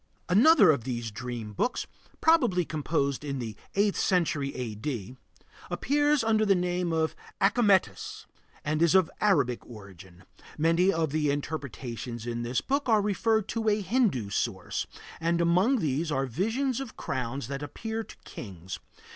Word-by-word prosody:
Another 235 Hz, -, +7 dB
of 140 Hz, -6 st, -1 dB
these 120 Hz, -3 st, -3 dB
dream 115 Hz, -1 st, -6 dB
books, 245 Hz, -, -1 dB, 0.4 s
probably 245 Hz, -, +4 dB
composed 145 Hz, -3 st, -1 dB
in 140 Hz, -2 st, -3 dB
the 115 Hz, -4 st, -5 dB, 0.2 s
eighth 200 Hz, 0 st, +2 dB
century 155 Hz, -7 st, +1 dB
A.D., 120 Hz, -1 st, -4 dB, 0.5 s
appears 290 Hz, -1 st, +2 dB
under 220 Hz, -1 st, +3 dB
the 200 Hz, -2 st, +4 dB
name 180 Hz, -1 st, 0 dB
of 160 Hz, -1 st, 0 dB, 0.2 s
Achametis 200 Hz, -2 st, +2 dB, 0.4 s
and 155 Hz, +1 st, 0 dB
is 170 Hz, 0 st, +4 dB
of 185 Hz, -3 st, +4 dB
Arabic 140 Hz, -, +2 dB
origin. 95 Hz, -5 st, -13 dB, 0.3 s
Many 165 Hz, +4 st, +3 dB
of 160 Hz, -4 st, 0 dB
the 150 Hz, -1 st, +1 dB
interpretations 130 Hz, -5 st, -4 dB
in 120 Hz, 0 st, -3 dB
this 120 Hz, +1 st, -1 dB
book 280 Hz, -1 st, -1 dB
are 220 Hz, -2 st, +5 dB
referred 215 Hz, +1 st, +1 dB
to 225 Hz, -1 st, 0 dB
a 210 Hz, 0 st, +2 dB
Hindu 190 Hz, -, +1 dB
source, -, -, -2 dB, 0.3 s
and 170 Hz, +1 st, +1 dB
among 180 Hz, +10 st, +3 dB
these 155 Hz, -, -1 dB
are 135 Hz, -1 st, +1 dB
visions 225 Hz, -, -1 dB
of 270 Hz, -4 st, -7 dB
crowns 130 Hz, -1 st, -3 dB
that 140 Hz, +1 st, -4 dB
appear 220 Hz, +10 st, -4 dB
to -, -, -13 dB
kings. 95 Hz, -4 st, -8 dB
160 Hz, 145 wpm, -28 LUFS, 125-210 Hz, 0.5 s, Another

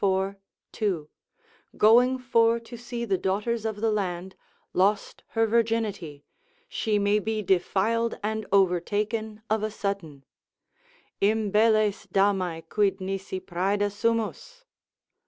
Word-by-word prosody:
2,) 185 Hz, -9 st, -2 dB, 0.7 s
going 245 Hz, +4 st, +5 dB
for 230 Hz, -2 st, +2 dB
to 230 Hz, +1 st, -11 dB
see 235 Hz, 0 st, -5 dB
the 195 Hz, -5 st, 0 dB
daughters 210 Hz, +5 st, -1 dB
of 215 Hz, -2 st, -3 dB
the 225 Hz, -1 st, +2 dB
land, 190 Hz, -2 st, -3 dB, 0.4 s
lost 200 Hz, +3 st, +1 dB
her 225 Hz, -, +5 dB
virginity, 220 Hz, -10 st, -1 dB, 0.4 s
she 215 Hz, -, -1 dB
may 205 Hz, +1 st, +2 dB
be 215 Hz, 0 st, -2 dB
defiled 205 Hz, +5 st, +1 dB
and 220 Hz, 0 st, -2 dB
overtaken 210 Hz, +4 st, 0 dB
of 220 Hz, 0 st, 0 dB
a 215 Hz, -, -1 dB
sudden: 195 Hz, -10 st, -5 dB, 1.0 s
Imbelles 215 Hz, 0 st, +2 dB
damae 185 Hz, -5 st, 0 dB
quid 205 Hz, +2 st, +1 dB
nisi 190 Hz, 0 st, -4 dB
praeda 200 Hz, +4 st, -1 dB
sumus? 230 Hz, -, -2 dB
210 Hz, 110 wpm, -26 LUFS, 190-225 Hz, 1.0 s, going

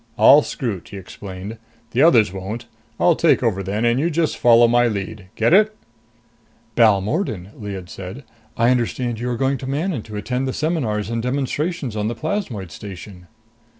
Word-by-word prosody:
"I'll 145 Hz, +4 st, +8 dB
scrut," 115 Hz, -, -4 dB
he 100 Hz, -, -9 dB
explained. 95 Hz, +3 st, -8 dB, 0.3 s
"The 125 Hz, -, +1 dB
others 115 Hz, -, +5 dB
won't. 95 Hz, +5 st, -5 dB, 0.3 s
I'll -, -, +4 dB
take -, -, +3 dB
over 95 Hz, -, +1 dB
then 100 Hz, +4 st, -2 dB
and 120 Hz, +2 st, +2 dB
you 165 Hz, +4 st, +1 dB
just 165 Hz, -1 st, 0 dB
follow 120 Hz, 0 st, +6 dB
my 120 Hz, +1 st, +4 dB
lead. 100 Hz, -2 st, -4 dB
Get 115 Hz, +8 st, +2 dB
it?" 215 Hz, +2 st, +5 dB, 1.0 s
"Balmordan," 105 Hz, -, +2 dB
Lyad 100 Hz, -4 st, -7 dB
said, 95 Hz, +9 st, -8 dB, 0.3 s
"I 115 Hz, +2 st, +4 dB
understand 120 Hz, -1 st, -1 dB
you 120 Hz, +1 st, -2 dB
are 120 Hz, -, -2 dB
going 135 Hz, +1 st, 0 dB
to 130 Hz, -, -6 dB
Manon 150 Hz, -, -1 dB
to 105 Hz, 0 st, -10 dB
attend 125 Hz, +5 st, -2 dB
the 130 Hz, -, -2 dB
seminars 120 Hz, -10 st, -1 dB
and 115 Hz, 0 st, -1 dB
demonstrations 140 Hz, -, -2 dB
on 105 Hz, 0 st, -1 dB
the 120 Hz, -, -3 dB
plasmoid 115 Hz, -, -3 dB
station?" 90 Hz, 0 st, -10 dB
115 Hz, 170 wpm, -21 LUFS, 100-135 Hz, 1.0 s, I'll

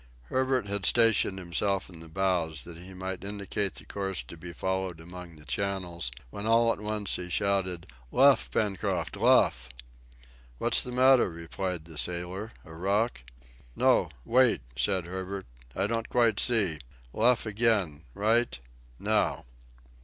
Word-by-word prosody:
Herbert 130 Hz, -3 st, +1 dB
had 100 Hz, -1 st, +1 dB
stationed 115 Hz, -4 st, +4 dB
himself 95 Hz, +2 st, -1 dB
in 85 Hz, -3 st, -13 dB
the 80 Hz, -, -10 dB
bows 85 Hz, -2 st, -1 dB
that 85 Hz, -, -10 dB
he 90 Hz, +3 st, -11 dB
might 95 Hz, 0 st, -5 dB
indicate 100 Hz, 0 st, -3 dB
the -, -, -11 dB
course 95 Hz, -8 st, -3 dB
to 60 Hz, -, -11 dB
be 85 Hz, +2 st, -9 dB
followed 95 Hz, -1 st, -2 dB
among 90 Hz, 0 st, -10 dB
the 75 Hz, -1 st, -15 dB
channels, 85 Hz, 0 st, -2 dB, 0.2 s
when 100 Hz, +2 st, -5 dB
all 115 Hz, +1 st, +5 dB
at -, -, -10 dB
once 105 Hz, -1 st, -2 dB
he 90 Hz, 0 st, -6 dB
shouted, 95 Hz, -3 st, 0 dB, 0.3 s
"Luff, 135 Hz, +1 st, +5 dB
Pencroft, 100 Hz, -6 st, -1 dB
luff!" -, -, +3 dB, 0.9 s
"What's -, -, +3 dB
the 125 Hz, -, -5 dB
matter," 130 Hz, -2 st, +5 dB
replied 85 Hz, +1 st, -4 dB
the 80 Hz, -3 st, -6 dB
sailor; 90 Hz, -, -3 dB
"a 80 Hz, -, -12 dB
rock?" 100 Hz, -, 0 dB, 0.5 s
"No -, -, +3 dB, 0.2 s
wait," 125 Hz, -, +4 dB
said 90 Hz, +8 st, +1 dB
Herbert; 95 Hz, +2 st, -5 dB, 0.3 s
"I 95 Hz, -, +1 dB
don't 115 Hz, +1 st, -2 dB
quite 115 Hz, -4 st, +3 dB
see. 100 Hz, -11 st, +2 dB, 0.3 s
Luff 120 Hz, +1 st, +3 dB
again 105 Hz, -8 st, +1 dB
right 110 Hz, -, +2 dB, 0.4 s
now." -, -, +1 dB
95 Hz, 145 wpm, -28 LUFS, 85-110 Hz, 0.9 s, all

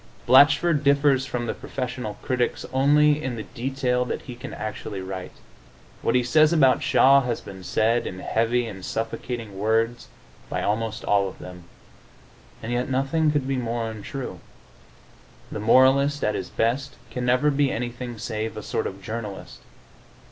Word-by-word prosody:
Blatchford 145 Hz, +4 st, +5 dB
differs 140 Hz, -2 st, +3 dB
from 120 Hz, -2 st, -3 dB
the -, -, -2 dB
professorial 125 Hz, -5 st, -5 dB
critics 125 Hz, -1 st, -1 dB
only 145 Hz, +2 st, +4 dB
in 130 Hz, -2 st, -2 dB
the 110 Hz, -, -5 dB
detail 125 Hz, +2 st, -1 dB
that -, -, -4 dB
he 125 Hz, -, -8 dB
can 120 Hz, -, -8 dB
actually 105 Hz, -2 st, -5 dB
write. 95 Hz, -1 st, -6 dB, 0.7 s
What -, -, +1 dB
he 125 Hz, -, +3 dB
says 155 Hz, +5 st, +4 dB
about 135 Hz, -6 st, +4 dB
Shaw 135 Hz, +1 st, +5 dB
has 125 Hz, -3 st, -2 dB
been 95 Hz, -1 st, -11 dB
said, 115 Hz, +5 st, +1 dB
in 90 Hz, -, -6 dB
heavy 115 Hz, +5 st, 0 dB
and 95 Hz, -5 st, -8 dB
suffocating 115 Hz, -1 st, -4 dB
words, 115 Hz, +3 st, 0 dB, 0.4 s
by -, -, -2 dB
almost 110 Hz, +1 st, -1 dB
all 100 Hz, -1 st, +3 dB
of -, -, -13 dB
them. 90 Hz, -1 st, -11 dB, 1.0 s
And 115 Hz, -, -4 dB
yet 125 Hz, +2 st, -1 dB
nothing 135 Hz, +4 st, +1 dB
could 145 Hz, -3 st, -1 dB
be 135 Hz, -1 st, 0 dB
more 120 Hz, -1 st, -2 dB
untrue. 125 Hz, +5 st, -7 dB, 1.1 s
The -, -, -4 dB
moralist, 135 Hz, +6 st, +4 dB
at 105 Hz, -, +1 dB
his 95 Hz, -, -4 dB
best, 130 Hz, +4 st, -1 dB, 0.2 s
can 125 Hz, +2 st, -4 dB
never 125 Hz, +4 st, +3 dB
be 140 Hz, -1 st, +1 dB
anything 120 Hz, 0 st, -4 dB
save 110 Hz, 0 st, -4 dB
a 105 Hz, -, -6 dB
sort 110 Hz, -, -2 dB
of 95 Hz, 0 st, -9 dB
journalist. 110 Hz, -2 st, -6 dB
120 Hz, 160 wpm, -24 LUFS, 110-135 Hz, 1.1 s, Blatchford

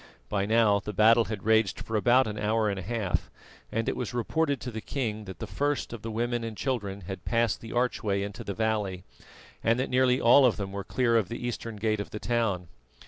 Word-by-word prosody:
By 100 Hz, 0 st, 0 dB
now 110 Hz, -2 st, +4 dB
the 105 Hz, +1 st, -6 dB
battle 115 Hz, +3 st, +5 dB
had 105 Hz, -3 st, -5 dB
raged 110 Hz, -2 st, +2 dB
for 115 Hz, -, -4 dB
about 120 Hz, +5 st, +4 dB
an 105 Hz, -1 st, -4 dB
hour 110 Hz, 0 st, +1 dB
and 100 Hz, -, -3 dB
a -, -, -4 dB
half, 105 Hz, -1 st, -2 dB, 0.4 s
and 115 Hz, 0 st, -1 dB
it -, -, 0 dB
was 125 Hz, 0 st, -4 dB
reported 140 Hz, +4 st, 0 dB
to 125 Hz, -, -5 dB
the 110 Hz, -1 st, -5 dB
king 110 Hz, -6 st, -3 dB
that 95 Hz, -3 st, -8 dB
the -, -, -5 dB
first 145 Hz, -3 st, -2 dB
of 115 Hz, -, -7 dB
the 115 Hz, -, -5 dB
women 120 Hz, +1 st, -1 dB
and 115 Hz, -2 st, -5 dB
children 105 Hz, -7 st, -2 dB
had 95 Hz, 0 st, -7 dB
passed 115 Hz, -4 st, +1 dB
the 115 Hz, -, -8 dB
archway 110 Hz, -5 st, 0 dB
into 100 Hz, +3 st, -6 dB
the 100 Hz, -3 st, -4 dB
valley, 105 Hz, -4 st, -1 dB, 0.6 s
and 115 Hz, +2 st, +3 dB
that 130 Hz, -, -1 dB
nearly 130 Hz, 0 st, +3 dB
all 125 Hz, +4 st, +7 dB
of 125 Hz, -3 st, +4 dB
them 100 Hz, -2 st, -4 dB
were 100 Hz, 0 st, -4 dB
clear 115 Hz, +2 st, +2 dB
of 105 Hz, -5 st, 0 dB
the 120 Hz, +1 st, -5 dB
eastern 115 Hz, -1 st, -5 dB
gate 110 Hz, 0 st, 0 dB
of 100 Hz, -, -4 dB
the -, -, -6 dB
town. 110 Hz, -7 st, 0 dB
110 Hz, 230 wpm, -28 LUFS, 100-120 Hz, 0.6 s, all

